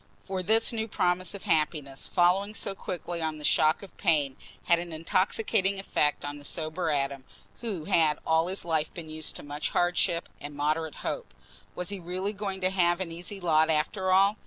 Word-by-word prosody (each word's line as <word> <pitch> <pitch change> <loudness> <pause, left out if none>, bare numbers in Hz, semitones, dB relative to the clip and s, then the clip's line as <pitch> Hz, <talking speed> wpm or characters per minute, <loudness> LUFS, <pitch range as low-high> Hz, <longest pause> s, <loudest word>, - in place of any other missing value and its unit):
For 190 -1 -4
this 220 +5 +3
new 220 -1 -1
promise 180 -2 0
of 200 - -8
happiness 150 -6 0
following 195 +4 +2
so 200 - 0
quickly 175 -2 -5
on 160 -1 -2
the 150 - -10
shock 155 +4 +3
of 195 - -12
pain 150 -7 +2 0.3
had 170 -1 +4
an 170 0 -6
intoxicating 195 +4 +1
effect 150 -7 0
on 145 0 -5
the - - -13
sober 160 +3 -2
Adam, 140 -2 -1 0.4
who 200 -10 -4
had 160 -5 +3
all 160 +1 +3
his 190 0 -3
life 160 -2 0
been 160 -2 -7
used 155 0 -3
to - - -7
much 145 +1 -3
hardship 175 -1 +1
and 145 0 -7
moderate 155 +2 0
hope. - - -3 0.4
Was 180 -1 -4
he 200 -1 -3
really 185 +4 -3
going 195 -2 -4
to 185 0 +2
have 175 -2 +3
an 185 -3 -3
easy 175 +4 -6
lot 160 -3 +3
after 175 +5 +1
all? 195 +3 +5
175 Hz, 190 wpm, -28 LUFS, 155-190 Hz, 0.4 s, all